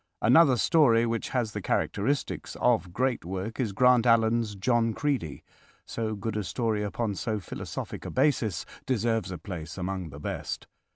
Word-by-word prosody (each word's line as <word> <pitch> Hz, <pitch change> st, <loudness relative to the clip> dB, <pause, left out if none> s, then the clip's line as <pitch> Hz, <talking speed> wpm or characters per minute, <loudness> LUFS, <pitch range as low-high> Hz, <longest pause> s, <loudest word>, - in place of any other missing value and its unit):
Another 130 Hz, +2 st, +6 dB
story 120 Hz, -5 st, +4 dB
which 115 Hz, -1 st, -2 dB
has 120 Hz, -4 st, -1 dB
the 105 Hz, -, -5 dB
characteristics 120 Hz, +9 st, -1 dB
of 115 Hz, -7 st, +2 dB
great 125 Hz, +4 st, 0 dB
work 95 Hz, +7 st, -5 dB
is 115 Hz, -6 st, 0 dB
Grant 125 Hz, +3 st, +4 dB
Allen's 115 Hz, -2 st, +3 dB
"John 115 Hz, +2 st, +1 dB
Creedy." 135 Hz, -, -2 dB, 0.4 s
So 110 Hz, -1 st, -3 dB
good 110 Hz, +1 st, -4 dB
a 105 Hz, -, -1 dB
story 110 Hz, 0 st, -1 dB
upon 105 Hz, +1 st, -2 dB
so 110 Hz, +2 st, -2 dB
philosophic 95 Hz, -, -6 dB
a -, -, -5 dB
basis 110 Hz, -, +1 dB, 0.2 s
deserves 115 Hz, -5 st, 0 dB
a 95 Hz, -, -5 dB
place 80 Hz, -1 st, -7 dB
among 95 Hz, -2 st, -3 dB
the 70 Hz, 0 st, -10 dB
best. -, -, -4 dB
110 Hz, 160 wpm, -28 LUFS, 100-120 Hz, 0.4 s, Another